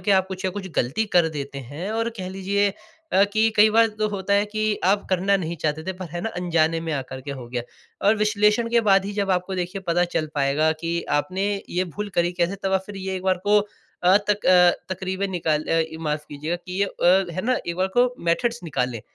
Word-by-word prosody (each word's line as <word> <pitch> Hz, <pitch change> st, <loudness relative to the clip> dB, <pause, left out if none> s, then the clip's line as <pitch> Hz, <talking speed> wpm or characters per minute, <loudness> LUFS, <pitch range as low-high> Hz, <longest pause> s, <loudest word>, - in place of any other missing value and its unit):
के 205 Hz, -, -1 dB
आप 190 Hz, -1 st, +3 dB
कुछ 190 Hz, 0 st, -6 dB
न -, -, 0 dB
कुछ 195 Hz, 0 st, -6 dB
ग़लती 135 Hz, -, +1 dB
कर 175 Hz, -2 st, +5 dB
देते 140 Hz, -3 st, -6 dB
हैं। 145 Hz, -, -6 dB
और 230 Hz, +1 st, 0 dB
कह 185 Hz, -1 st, -4 dB
लीजिए 195 Hz, +2 st, 0 dB, 0.4 s
अ, 195 Hz, +1 st, +6 dB
कि 220 Hz, +2 st, +2 dB
कई 210 Hz, +1 st, +7 dB
बार 225 Hz, +1 st, +5 dB
तो 215 Hz, 0 st, +1 dB
होता 200 Hz, 0 st, -1 dB
है 205 Hz, -, +3 dB
कि 215 Hz, 0 st, -1 dB, 0.2 s
आप 200 Hz, +2 st, +2 dB
करना 190 Hz, +2 st, +3 dB
नहीं 170 Hz, -2 st, -4 dB
चाहते 155 Hz, 0 st, -2 dB
थे 190 Hz, -, -1 dB
पर 185 Hz, -, -5 dB
है 175 Hz, 0 st, -4 dB
ना 225 Hz, -, -2 dB
अनजाने 165 Hz, -2 st, +1 dB
में 165 Hz, -1 st, -3 dB
आकर 130 Hz, -2 st, -4 dB
के 140 Hz, -, -7 dB
हो 130 Hz, -3 st, -7 dB
गया। 120 Hz, -1 st, -3 dB, 0.4 s
और 215 Hz, +2 st, +5 dB
विश्लेषण 210 Hz, +2 st, +2 dB
के 235 Hz, -, +4 dB
बाद 195 Hz, -1 st, +5 dB
ही 205 Hz, -, -4 dB
जब 200 Hz, -1 st, -1 dB
आपको 185 Hz, +1 st, 0 dB
देखिए 180 Hz, +2 st, -3 dB
पता 175 Hz, +1 st, +2 dB
चल 155 Hz, -, +1 dB
पाएगा 145 Hz, +3 st, +2 dB
कि 170 Hz, +1 st, -2 dB, 0.2 s
आपने 185 Hz, +5 st, -2 dB, 0.3 s
ये 180 Hz, +1 st, 0 dB
भूल 205 Hz, +4 st, -5 dB
करी 175 Hz, +1 st, +2 dB
कैसे 175 Hz, +2 st, -1 dB
तब 190 Hz, 0 st, -1 dB
आप 190 Hz, -, +3 dB
फ़िर 205 Hz, -1 st, -8 dB
ये 190 Hz, 0 st, -4 dB
एक 185 Hz, -, -6 dB
बार 190 Hz, -1 st, +2 dB
को 210 Hz, 0 st, +6 dB
अ, 190 Hz, -2 st, 0 dB
तक 210 Hz, 0 st, +1 dB
अ, 180 Hz, -1 st, +7 dB, 0.2 s
तक़रीबें 190 Hz, +1 st, -3 dB
निकाल 160 Hz, -4 st, 0 dB
अ, 165 Hz, 0 st, +2 dB, 0.2 s
माफ़ 150 Hz, -1 st, -2 dB
कीजियेगा 150 Hz, +4 st, -3 dB
कि 185 Hz, +2 st, -4 dB
ये 200 Hz, -, +5 dB
अ, 190 Hz, +1 st, +3 dB
है 185 Hz, -, -2 dB
ना 255 Hz, -, +2 dB
एक 170 Hz, 0 st, -3 dB
बार 185 Hz, +1 st, +1 dB
को 245 Hz, 0 st, +3 dB
मेथड्स 235 Hz, +8 st, +1 dB
निकाले 125 Hz, -7 st, -2 dB
185 Hz, 240 wpm, -23 LUFS, 165-200 Hz, 0.4 s, कई